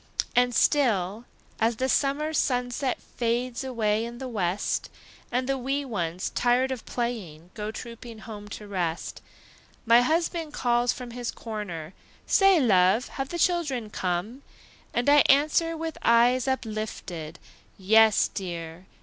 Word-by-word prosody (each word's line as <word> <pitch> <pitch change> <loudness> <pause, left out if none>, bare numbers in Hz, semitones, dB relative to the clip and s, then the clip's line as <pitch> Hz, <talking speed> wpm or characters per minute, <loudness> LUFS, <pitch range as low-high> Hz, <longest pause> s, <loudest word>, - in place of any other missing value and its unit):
And 245 0 +3
still, 220 -6 +2 0.3
as 225 +1 +2
the 260 +4 -1
summer 285 +4 +1
sunset 250 -1 0
Fades 240 +1 -2
away 225 -4 0
in 235 +1 -6
the 260 +1 -6
west, 195 -5 -1 0.4
And 250 +1 0
the 270 -1 0
wee 275 +3 -1
ones, 180 -7 -3
tired 250 +2 +2
of 255 -4 -6
playing, 185 -9 -4
Go 210 -1 -5
trooping 230 +1 -8
home 215 -1 -9
to 205 0 -8
rest, 175 -4 -3 0.6
My 235 +1 +6
husband 325 +3 0
calls 240 -2 +2
from 250 -2 -7
his 245 0 -4
corner, 195 -7 -6 0.3
"Say, 390 -3 +5
love, 205 -1 +3
have 270 -1 -4
the 345 - -4
children 300 -11 0
come?" 185 +9 -3 0.5
And 240 +2 -1
I 290 +1 +7
answer, 310 +4 +3
with 325 -1 -5
eyes 240 +2 +4
uplifted, 215 -10 -4 0.4
"Yes, 220 +2 +5
dear! 170 -1 -6
235 Hz, 135 wpm, -26 LUFS, 205-260 Hz, 0.6 s, I